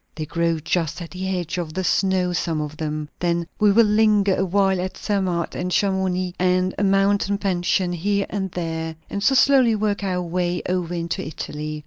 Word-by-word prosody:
They 155 Hz, -, -4 dB
grow 170 Hz, +1 st, 0 dB
just 165 Hz, +1 st, -1 dB
at 165 Hz, -, -10 dB
the 185 Hz, +1 st, -4 dB
edge 180 Hz, -2 st, -2 dB
of 160 Hz, -2 st, -5 dB
the 190 Hz, -, -1 dB
snow, 185 Hz, -1 st, +1 dB
some 165 Hz, -2 st, -1 dB
of 150 Hz, 0 st, -4 dB
them. 155 Hz, -1 st, -3 dB
Then 170 Hz, -1 st, 0 dB
we 210 Hz, -1 st, +5 dB
will 230 Hz, +3 st, +5 dB
linger 210 Hz, -2 st, +3 dB
a -, -, 0 dB
while 190 Hz, 0 st, +2 dB
at 185 Hz, +1 st, -5 dB
Zermatt 185 Hz, -5 st, -1 dB
and 180 Hz, -, -3 dB
Chamounix, 185 Hz, -1 st, 0 dB
and 185 Hz, 0 st, +2 dB
a -, -, +1 dB
mountain 200 Hz, +1 st, +2 dB
pension 180 Hz, -2 st, 0 dB
here 200 Hz, +3 st, 0 dB
and 195 Hz, -2 st, -2 dB
there, 160 Hz, -2 st, -3 dB, 0.2 s
and 200 Hz, -, -3 dB
so 270 Hz, +6 st, +3 dB
slowly 260 Hz, -3 st, +5 dB
work 205 Hz, -1 st, -1 dB
our 180 Hz, -2 st, -1 dB
way 175 Hz, 0 st, -1 dB
over 180 Hz, -1 st, -1 dB
into 170 Hz, 0 st, -3 dB
Italy. 150 Hz, 0 st, -5 dB
180 Hz, 190 wpm, -22 LUFS, 170-200 Hz, 0.2 s, we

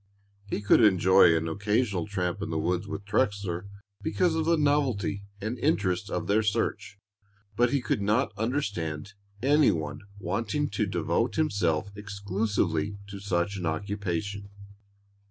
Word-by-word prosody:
He 100 Hz, -, -2 dB
could 105 Hz, +3 st, +5 dB
enjoy 95 Hz, -3 st, +6 dB
an 80 Hz, 0 st, -2 dB
occasional 100 Hz, +2 st, 0 dB
tramp 90 Hz, -4 st, -2 dB
in -, -, -3 dB
the 80 Hz, -, -1 dB
woods 90 Hz, +5 st, -1 dB
with 100 Hz, 0 st, -6 dB
Trexler 100 Hz, -4 st, -1 dB, 0.3 s
because 170 Hz, +1 st, +1 dB
of 160 Hz, -1 st, 0 dB
the 165 Hz, 0 st, +3 dB
novelty 135 Hz, -9 st, +1 dB
and 110 Hz, +4 st, -4 dB
interest 100 Hz, -, +1 dB
of -, -, -2 dB
their 105 Hz, +2 st, +3 dB
search; 105 Hz, -1 st, -1 dB, 0.6 s
but 120 Hz, +2 st, +3 dB
he 140 Hz, +1 st, +1 dB
could 110 Hz, -, 0 dB
not 105 Hz, +3 st, +1 dB
understand 100 Hz, -, -2 dB, 0.3 s
any 145 Hz, +2 st, +5 dB
one 75 Hz, -3 st, -2 dB, 0.2 s
wanting 110 Hz, -, -1 dB
to 105 Hz, -, -1 dB
devote 90 Hz, +5 st, 0 dB
himself 100 Hz, -, 0 dB
exclusively 100 Hz, 0 st, -1 dB
to 100 Hz, -1 st, -7 dB
such 95 Hz, 0 st, -1 dB
an 90 Hz, -3 st, -2 dB
occupation. 100 Hz, +3 st, -3 dB
100 Hz, 140 wpm, -28 LUFS, 90-115 Hz, 0.6 s, enjoy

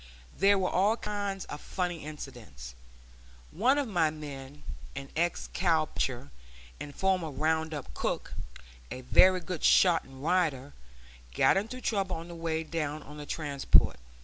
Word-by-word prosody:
There 200 Hz, +1 st, +4 dB
were 185 Hz, -1 st, +1 dB
all 205 Hz, +5 st, +3 dB
kinds 205 Hz, -3 st, -3 dB
of 145 Hz, -, -8 dB
funny 175 Hz, -4 st, -3 dB
incidents. 120 Hz, -, -9 dB, 0.8 s
One 250 Hz, -, +3 dB
of 285 Hz, -3 st, 0 dB
my 170 Hz, -7 st, +2 dB
men, 145 Hz, -2 st, -9 dB, 0.3 s
an 135 Hz, 0 st, -6 dB
ex 170 Hz, +2 st, 0 dB
cow 165 Hz, -4 st, +2 dB
puncher 120 Hz, -, -3 dB, 0.5 s
and 145 Hz, -1 st, -8 dB
former 185 Hz, -4 st, +1 dB
round 160 Hz, +3 st, 0 dB
up 145 Hz, -3 st, -6 dB
cook, -, -, -3 dB, 0.6 s
a 130 Hz, -, -6 dB
very 185 Hz, +8 st, +5 dB
good 175 Hz, -1 st, -5 dB
shot 175 Hz, -3 st, +5 dB
and 135 Hz, 0 st, -13 dB
rider, 150 Hz, -6 st, +1 dB, 0.6 s
got -, -, +5 dB
into 220 Hz, +6 st, -2 dB
trouble 195 Hz, -5 st, 0 dB
on 165 Hz, +1 st, -7 dB
the 170 Hz, -, -8 dB
way 165 Hz, -1 st, -2 dB
down 155 Hz, -2 st, -3 dB
on 150 Hz, +1 st, -11 dB
the 145 Hz, -1 st, -8 dB
transport. 145 Hz, -, +3 dB
160 Hz, 150 wpm, -30 LUFS, 145-185 Hz, 0.8 s, very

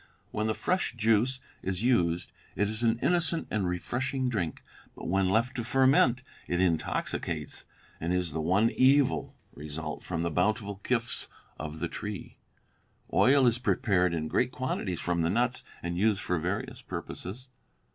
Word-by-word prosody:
When 110 Hz, +1 st, -1 dB
the 110 Hz, -, 0 dB
fresh 185 Hz, -7 st, 0 dB
juice 115 Hz, +3 st, +2 dB, 0.2 s
is 95 Hz, +2 st, -2 dB
used, 85 Hz, -9 st, +2 dB, 0.2 s
it 105 Hz, +2 st, +2 dB
is 110 Hz, +2 st, -3 dB
an 115 Hz, -1 st, +3 dB
innocent 170 Hz, -1 st, +2 dB
and 100 Hz, -4 st, 0 dB
refreshing 130 Hz, +8 st, -1 dB
drink; 95 Hz, -9 st, -2 dB, 0.3 s
but -, -, -7 dB
when 95 Hz, +1 st, +2 dB
left 115 Hz, +6 st, +2 dB
to 120 Hz, -, -1 dB
ferment, 130 Hz, 0 st, +4 dB, 0.2 s
it 90 Hz, -, 0 dB
intoxicates, 85 Hz, -4 st, -1 dB, 0.3 s
and 85 Hz, +2 st, -2 dB
is 90 Hz, -2 st, 0 dB
the 80 Hz, +2 st, -2 dB
one 95 Hz, +8 st, +3 dB
evil 135 Hz, +1 st, +3 dB, 0.2 s
result 75 Hz, +1 st, -6 dB
from 85 Hz, -2 st, -3 dB
the 85 Hz, -, -1 dB
bountiful 100 Hz, +3 st, 0 dB
gifts 120 Hz, -2 st, 0 dB, 0.3 s
of 75 Hz, 0 st, -5 dB
the 85 Hz, -, -2 dB
tree. 105 Hz, +2 st, -6 dB, 0.7 s
Oil 135 Hz, +1 st, +5 dB
is 120 Hz, 0 st, +3 dB
prepared 95 Hz, -9 st, +2 dB
in 80 Hz, -1 st, -2 dB
great 125 Hz, +9 st, +1 dB
quantities 105 Hz, -9 st, -2 dB
from 85 Hz, -1 st, 0 dB
the 85 Hz, -, +2 dB
nuts 120 Hz, +6 st, +1 dB, 0.2 s
and 85 Hz, 0 st, -2 dB
used 105 Hz, -1 st, +2 dB
for 90 Hz, -1 st, 0 dB
various 90 Hz, +5 st, -3 dB
purposes." 125 Hz, +8 st, -7 dB
105 Hz, 155 wpm, -29 LUFS, 90-125 Hz, 0.7 s, Oil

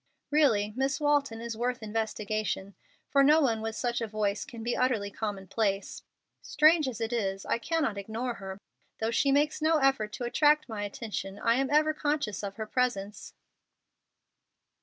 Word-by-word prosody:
Really 225 Hz, -9 st, +3 dB
Miss 270 Hz, +2 st, 0 dB
Walton 285 Hz, -6 st, +1 dB
is 235 Hz, -1 st, -4 dB
worth 245 Hz, +1 st, -2 dB
investigation, 215 Hz, -2 st, -2 dB, 0.4 s
for 275 Hz, -, +5 dB
no 300 Hz, +3 st, +6 dB
one 230 Hz, -7 st, +1 dB
with 225 Hz, 0 st, -3 dB
such 240 Hz, -1 st, -1 dB
a 230 Hz, -, -1 dB
voice 210 Hz, -1 st, -1 dB
can 230 Hz, -2 st, -9 dB
be 240 Hz, +1 st, -1 dB
utterly 225 Hz, -6 st, 0 dB
commonplace. 200 Hz, -1 st, -2 dB, 0.4 s
Strange 310 Hz, 0 st, +4 dB
as 250 Hz, -4 st, -4 dB
it 225 Hz, +1 st, -2 dB
is, 195 Hz, -4 st, -2 dB
I -, -, 0 dB
cannot 280 Hz, -7 st, -1 dB
ignore 225 Hz, +5 st, -3 dB
her. 190 Hz, 0 st, -6 dB, 0.4 s
Though 225 Hz, +1 st, -1 dB
she 275 Hz, +4 st, +2 dB
makes 295 Hz, +2 st, +2 dB
no 320 Hz, +1 st, +3 dB
effort 270 Hz, -7 st, +2 dB
to -, -, -5 dB
attract 300 Hz, +4 st, +3 dB
my 215 Hz, -3 st, -4 dB
attention, 200 Hz, -2 st, -5 dB
I 230 Hz, +2 st, +2 dB
am 270 Hz, 0 st, 0 dB
ever 305 Hz, +1 st, +3 dB
conscious 290 Hz, -9 st, -1 dB
of 200 Hz, -1 st, -5 dB
her 220 Hz, -, -4 dB
presence." 215 Hz, -4 st, -2 dB
230 Hz, 165 wpm, -29 LUFS, 210-275 Hz, 0.4 s, no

